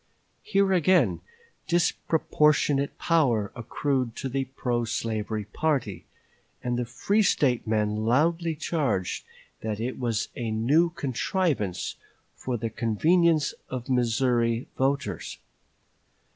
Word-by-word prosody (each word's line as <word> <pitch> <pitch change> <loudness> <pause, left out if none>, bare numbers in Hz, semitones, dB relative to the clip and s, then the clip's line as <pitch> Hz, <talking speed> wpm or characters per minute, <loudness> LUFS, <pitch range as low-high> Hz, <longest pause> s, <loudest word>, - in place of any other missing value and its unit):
Here 195 -1 +2
again 185 +1 +3 0.5
disproportionate 150 -4 +2
power 125 - +2
accrued 125 0 -1
to 135 - -4
the 135 +1 -1
pro 125 -2 -2
slavery 110 -1 -2
party, 125 - -1 0.6
and 125 -1 -1
the 120 0 -1
free 200 - +1
State 130 - +2
men 105 -1 +1
loudly 160 +9 +1
charged 140 - -1 0.4
that 110 -1 -3
it 125 +3 -3
was 115 -4 -1
a 120 -2 -3
new 135 +11 +3
contrivance 140 - -1 0.4
for 125 -2 -3
the 115 0 -3
convenience 155 - +2 0.2
of 125 -1 -5
Missouri 120 -1 +1
voters. 140 +1 -1
130 Hz, 105 wpm, -26 LUFS, 115-155 Hz, 0.6 s, again